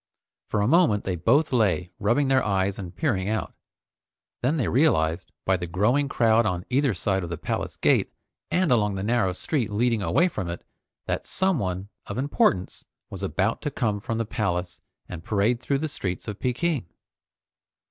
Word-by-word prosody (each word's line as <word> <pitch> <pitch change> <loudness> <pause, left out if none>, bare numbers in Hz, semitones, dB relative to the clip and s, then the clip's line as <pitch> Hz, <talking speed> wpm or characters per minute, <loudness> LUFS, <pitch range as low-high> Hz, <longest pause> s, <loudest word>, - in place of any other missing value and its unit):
For 105 - 0
a 105 - +2
moment 155 - +4
they 95 - -2
both 135 - +2
lay 95 -6 +1
rubbing 120 +8 +2
their 130 -1 +3
eyes 95 -1 0
and 90 -2 -7
peering 105 - 0
out. 110 0 -2 0.9
Then 140 +6 +1
they 125 - 0
realized, 85 - +2
by 95 0 +3
the 90 -1 -5
growing 120 +11 +1
crowd 115 -3 +3
on 90 -5 -2
either 135 -4 +2
side 95 +1 0
of 85 - -5
the 85 - -4
palace - - -3
gate - - +2 0.4
and 180 -4 +1
along 105 -4 +2
the 95 - -3
narrow 115 -3 +2
street 120 - -2
leading 115 +1 +1
away 170 - +3
from 95 - -4
it, 85 - -6 0.4
that - - -3
someone 100 - 0 0.2
of 100 - -5
importance 125 -8 +1 0.3
was - - -7
about 100 +4 0
to 150 - -2
come 110 -6 -1
from 115 +2 -3
the 115 - -1
palace 90 -5 -2 0.3
and 85 -2 -8
parade 110 +5 +1
through 140 +2 0
the 155 +3 -2
streets 95 -10 -4
of 105 -1 -5
Peking. 130 - -1
110 Hz, 180 wpm, -25 LUFS, 95-130 Hz, 0.9 s, moment